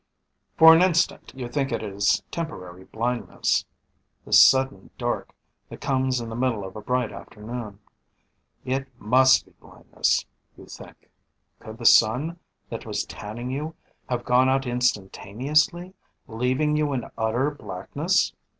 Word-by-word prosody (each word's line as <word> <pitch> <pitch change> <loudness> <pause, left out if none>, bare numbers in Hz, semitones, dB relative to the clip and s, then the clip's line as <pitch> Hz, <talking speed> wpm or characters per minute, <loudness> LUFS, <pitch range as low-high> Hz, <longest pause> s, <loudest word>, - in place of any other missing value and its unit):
_ - - -43
For 160 0 +9
an 165 - +5
instant 175 -2 +1
you 130 -2 -5
think 135 +2 -2
it 115 -1 -2
is 100 -1 0
temporary 95 - -7
blindness, 120 +2 -1 0.6
this - - +7
sudden 130 -7 +3
dark - - -3 0.4
that - - -10
comes 130 -2 0
in 115 - -6
the 115 - -6
middle 120 -5 -1
of 95 - -10
a 105 - -7
bright 125 0 -1
afternoon. 110 -1 -8 0.9
It 135 +1 -2
must 130 +5 +4
be - - -23
blindness, - - -1 0.3
you - - -13
think; - - -14 0.5
could 110 0 -10
the 120 - -9
sun 130 +12 +4 0.3
that - - -6
was - - -2
tanning 120 +4 -7
you 150 +4 -4 0.3
have 120 -1 -2
gone 125 +1 +4
out 135 0 +1
instantaneously, 125 - 0 0.3
leaving 130 +6 0
you 150 -2 0
in 125 -3 -3
utter 115 +6 0
blackness? 145 - -1
125 Hz, 140 wpm, -24 LUFS, 110-140 Hz, 0.9 s, For